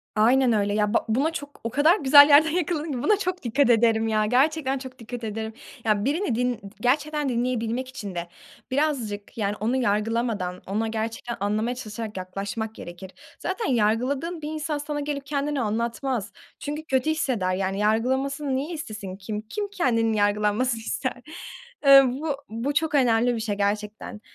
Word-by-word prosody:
Aynen 240 +3 +4
öyle. 205 -1 +1
Ya, 210 +1 +1
ba - - +2
buna 275 +9 +2
çok, 285 -2 -8
o 230 - -2
kadar 310 - +4
güzel 285 +1 +8
yerden 305 +2 +7
yakaladın 320 -2 -1
ki 245 -2 -3
buna 425 -1 +4
çok 365 -4 -3
dikkat 245 +2 +2
ederim 225 -1 +4
ya. 215 -1 +2
Gerçekten 270 +3 +2
çok 260 0 -9
dikkat 240 +1 -7
ederim. 220 0 -4 0.3
Ya 210 -1 +1
birini 305 - 0
din 250 +1 +1
d - - -11 0.2
gerçekten 295 +2 +1
dinleyebilmek 245 0 -1
için 205 -8 -7
de 170 0 -3 0.4
birazcık, 250 -9 -1
yani, 205 -1 -1
onu 230 +4 0
yargılamadan, 215 -5 0
ona 215 +3 -1
gerçekten 225 +2 -4
anlamaya 215 +4 0
çalışarak 215 -3 -6
yaklaşmak 200 +4 -4
gerekir. 175 +2 -9 0.3
Zaten 410 +5 -3
yargıladığın 260 +9 0
bir 295 - -5
insan 305 -1 -3
sana 290 0 -4
gelip 285 -1 -3
kendini 285 -1 -1
anlatmaz. 230 +1 -2 0.3
Çünkü 300 +2 -4
kötü 265 +2 +1
hisseder, 245 -12 0
yani, 195 +1 -2
yargılanmasını 265 +6 0
niye 295 +6 -2
istesin? 215 - -6
Kim 210 +2 -5
kim 405 - -4
kendinin 230 - +1
yargılanmasını 210 +3 +1
ister? 255 +3 -2 0.7
Iıı, 275 -2 +8
bu 300 -3 -1
bu 235 +6 -2
çok 305 0 +1
önemli 240 -2 +3
bir - - -3
şey 215 -2 -2
gerçekten. 210 +1 -3
240 Hz, 165 wpm, -25 LUFS, 215-285 Hz, 0.7 s, güzel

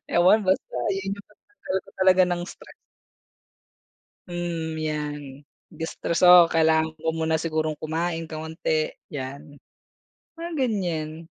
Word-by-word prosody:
Ewan 180 +5 +5
basta 190 +1 0 0.2
'yon 195 0 -2
'yong 200 - -13
pantanggal 210 - -6
ko - - -15
talaga 185 0 +5
ng 175 0 -1
stress. - - -12 1.5
Mm, 170 -2 -3
'yan. 150 -1 -3 0.5
De-stress, 165 +2 -1
oo. 175 -1 +9
Kailangan 160 -1 +2
ko 160 0 -1
muna 160 0 +1
sigurong 155 -1 -1
kumain 165 +1 -2
kaunti, 155 0 -2 0.2
'yan. 140 +1 -7 0.7
Mga 335 +1 -6
ganiyan. 170 - -1
165 Hz, 115 wpm, -25 LUFS, 155-185 Hz, 1.5 s, oo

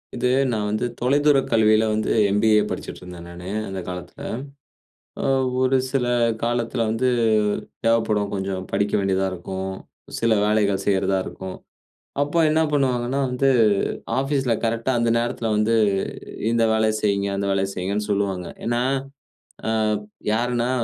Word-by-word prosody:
இது 125 +1 0 0.2
நான் 105 -2 -1
வந்து 110 +3 -1
தொலைதூரக் 140 +2 +3
கல்வியில 110 -1 +4
வந்து 110 0 0 0.2
எம்.பி.ஏ 105 +1 +4
படிச்சுட்ருந்தேன் 90 -1 -7
நானு. 90 +2 -8 0.2
அந்த 95 -1 -5
காலத்தில. 90 -1 -8 1.0
ஆ - - -2 0.4
ஒரு 130 +1 +3
சில 130 -3 0 0.4
காலத்தில 120 0 -1
வந்து 125 +3 +1 0.8
தேவைப்படும், 110 -3 +2
கொஞ்சம் 95 -1 -3
படிக்க 100 0 0
வேண்டியதா 95 -1 +1
இருக்கும், 95 +2 -5 0.5
சில 115 -1 +2
வேலைகள் 100 -2 +1
செய்றதா 95 -1 +2
இருக்கும், 95 -1 -7 0.7
அப்ப 165 +4 +1
என்ன 160 +1 +3
பண்ணுவாங்கன்னா 130 -1 +1
வந்து, 135 +2 +2 0.7
ஆஃபீஸ்ல 135 -3 0
கரெக்ட்டா 115 +3 0
அந்த 115 0 +2
நேரத்தில 115 -1 -2
வந்து, 110 +2 +2 0.8
இந்த 115 -1 +2
வேலைய 110 0 +2
செய்யிங்க, 100 -1 +1
அந்த 100 - -1
வேலைய 95 0 0
செய்யிங்கன்னு 100 +3 -2
சொல்லுவாங்க. 95 -3 -1 0.2
ஏனா, 120 +1 +1 0.9
அ - - +1 0.6
யாருன்னா 120 +1 0
110 Hz, 125 wpm, -23 LUFS, 95-120 Hz, 1.0 s, கல்வியில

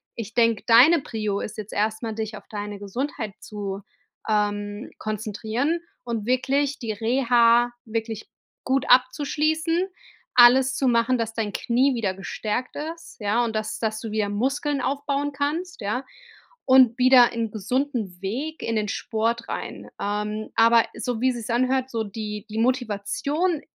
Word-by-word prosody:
Ich 225 -1 -6
denke, 230 -2 +2
deine 255 +9 +7
Prio 215 -5 -2
ist 215 - -6
jetzt 215 -1 -7
erst 215 +2 -1
mal, 225 -1 -2
dich 220 0 -4
auf 200 - -13
deine 205 -1 -5
Gesundheit 220 +1 -4
zu, 200 -2 -6 0.5
ähm, 205 +1 -1
konzentrieren 220 +8 -2 0.2
und 230 -4 -3
wirklich 275 +3 +1
die 230 -3 -3
Reha 235 +1 +3
wirklich 225 -1 -4 0.4
gut 265 0 +1
abzuschließen, 305 +6 +2 0.5
alles 255 +2 +7
zu 270 - +1
machen, 240 +1 +3
dass 225 -1 -2
dein 220 -3 -3
Knie 255 +3 +2
wieder 210 -5 -1
gestärkt 210 +5 -4
ist, 325 +3 -7
ja, 210 +4 +2
und 225 -1 -4
dass 215 0 -3
dass 215 -1 -1
du 225 - -5
wieder 215 -1 0
Muskeln 270 +6 -1
aufbauen 280 +1 -1
kannst, 310 +6 -2
ja, 220 +6 -2 0.6
und 260 -3 +6
wieder 250 -1 +7
ein 230 -2 -2
gesunden 225 -2 -2
Weg 270 +11 -4
in 230 - -1
den 210 -1 0
Sport 230 +2 -1
rein. - - -5
Ähm, 210 +1 -2
aber 230 0 +5
so 230 0 -3
wie 260 +1 +3
sich's 240 -2 -6
anhört, 255 +2 +1
so 225 -1 -1
die 210 0 -6
die 215 - -6
Motivation 255 - 0
230 Hz, 150 wpm, -24 LUFS, 215-260 Hz, 0.6 s, deine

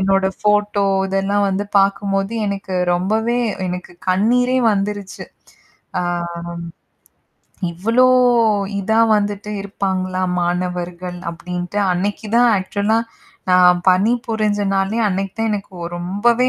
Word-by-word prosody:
என்னோட 195 0 +2
ஃபோட்டோ 210 -1 +2 0.2
இதெல்லாம் 195 +1 0
வந்து 195 +2 -1
பாக்கும்போது 195 +1 +1
எனக்கு 195 -1 -4 0.2
ரொம்பவே 220 +7 0 0.3
எனக்கு 180 0 -5 0.2
கண்ணீரே 245 +7 +2
வந்துருச்சு. 200 -1 -3 0.8
ஆ, - - -1 1.7
இவ்வளோ 225 +9 +2 0.8
இத 220 +3 -2 0.2
வந்துட்டு 205 0 -2
இருப்பாங்கள 190 -2 -3 0.3
மாணவர்கள் 180 0 -3
அப்படின்ட்டு, 180 +3 -5
அன்னைக்கு 205 +4 -2
தான் 240 -1 +5
ஆக்சுவல 200 +3 -1
-ஆ - - +2 0.5
நான் 180 -1 +6
பணி 190 +5 +3 0.2
புருஞ்ச, 215 -2 0
நாளே 195 +4 0
அன்னைக்கு 195 0 -2
தான் 225 - 0
எனக்கு 200 -2 -5 0.2
ரொம்பவே 205 +8 +1
195 Hz, 105 wpm, -19 LUFS, 185-210 Hz, 1.7 s, நான்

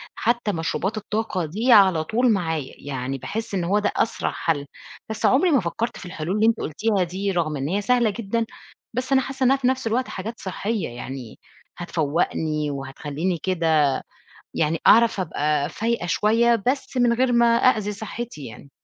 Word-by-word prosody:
حتّى 235 -2 0
مشروبات 185 +4 -2
الطاقة 210 -4 -2
دي 215 - 0
على 190 -7 +6
طول 235 +8 +2
معايا. 160 -7 -2
يعني 135 -1 -4
باحس 220 - -5
إن 185 -3 0
هو 195 +5 +2
ده 205 - 0
أسرع 225 - 0
حل، 145 -4 -1 0.4
بس 220 - -2
عمري 320 +7 +4
ما 280 - +5
فكرت 220 +6 -3
في - - -10
الحلول 175 +1 -3
اللي 215 +1 +3
أنتِ 230 0 +3
قُلتيها 200 +5 0
دي، 190 +3 -2
رغم 160 -4 -1
إن 135 +1 -2
هي 195 +6 0
سهلة 240 +1 +2
جدًا، 230 +2 -2 0.5
بس 255 +3 -3
أنا 265 -1 +5
حاسّة 265 0 -4
إنّها 260 +1 +5
في 260 -2 0
نَفْس 260 -2 0
الوقت 250 +3 0
حاجات 220 +5 -6
صحيّة، 200 0 -3
يعني 125 -1 -8 0.4
هتفوّقني 155 -2 -1
وهتخلّيني 145 +5 -3
كده، 160 -6 +2 0.5
يعني 160 +1 +1
أعرف 225 -2 +6
أبقى 150 -4 0
فايقة 230 -4 -2
شويّة، 225 +5 +2
بس 265 +1 -1
من 245 -1 +4
غير 250 +1 +2
ما 235 0 +5
أأذي 215 -4 +2
صحتي 220 - -7
يعني. 120 +5 -12
195 Hz, 170 wpm, -23 LUFS, 160-230 Hz, 0.5 s, على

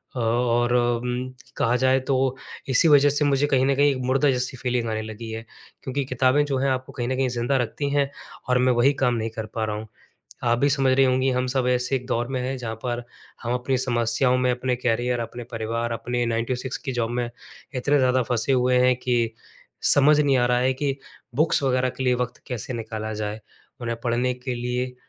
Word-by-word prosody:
अ, - - -3
और 120 +1 +1
उम, 125 +1 0 0.3
कहा 120 +2 +2
जाए 130 +1 +3
तो 130 -1 +1 0.3
इसी 130 +5 +5
वज़ह 145 0 +6
से 145 +1 +1
मुझे 140 0 +2
कहीं 130 -2 +2
न 140 - +2
कहीं 145 +1 +4
एक 135 - -2
मुर्दा 135 +3 +3
जैसी 130 +1 -2
फ़ीलिंग 120 -2 -1
आने 110 0 -2
लगी 110 +1 -7
है। 110 0 -6 0.4
क्योंकि 135 +1 -2
किताबें 130 +3 +2
जो 140 -2 -1
हैं 135 +1 +1
आपको 130 +1 -3
कहीं 120 -3 -3
न 130 - 0
कहीं 130 0 +1
ज़िंदा 120 +3 0
रखती 130 +4 -2
हैं 140 -1 +2 0.4
और 125 - +4
मैं 125 0 +3
वही 120 +4 +4
काम 125 -2 +3
नहीं 115 0 -2
कर 110 - -3
पा 110 -1 0
रहा 105 -1 -3
हूँ। 110 +1 -7 0.6
आप 120 0 +2
भी 140 - +3
समझ 135 -2 +2
रही 135 - +5
होंगी 130 +1 +2
हम 125 0 0
सब 130 0 0
ऐसे 125 +1 +1
एक 125 -1 -6
दौर 120 -1 -1
में 130 -1 -2
हैं 130 +1 -2
जहाँ 115 -2 -4
पर 120 -1 -2 0.4
हम 120 +1 -1
अपनी 125 +1 0
समस्याओं 125 0 +1
में 125 0 +2
अपने 125 0 -1
कैरियर, 120 0 0
अपने 120 +1 -6
परिवार, 115 +1 -2
अपने 120 +2 -2
9 115 0 0
टू 130 - -1
6 130 0 -4
की 135 - -5
जॉब 120 -2 -1
में 120 0 -2 0.4
इतने 140 +3 +2
ज़्यादा 130 -1 +3
फँसे 120 +2 0
हुए 125 -1 +3
हैं 125 -1 +3
कि 120 -2 0 0.6
समझ 145 +1 +5
नहीं 140 -2 +3
आ 120 - +3
रहा 125 0 +2
है 130 +1 +2
कि 135 0 -2 0.4
बुक्स 155 0 +3
वग़ैरह 130 -1 +2
के 130 +1 -6
लिए 125 -1 +3
वक़्त 125 0 -3
कैसे 125 0 -5
निकाला 110 -1 -5
जाए? 105 0 -4 0.4
उन्हें 115 -1 -3
पढ़ने 125 +1 +1
के 125 0 -5
लिए 125 +1 -3
125 Hz, 220 wpm, -24 LUFS, 120-130 Hz, 0.6 s, वज़ह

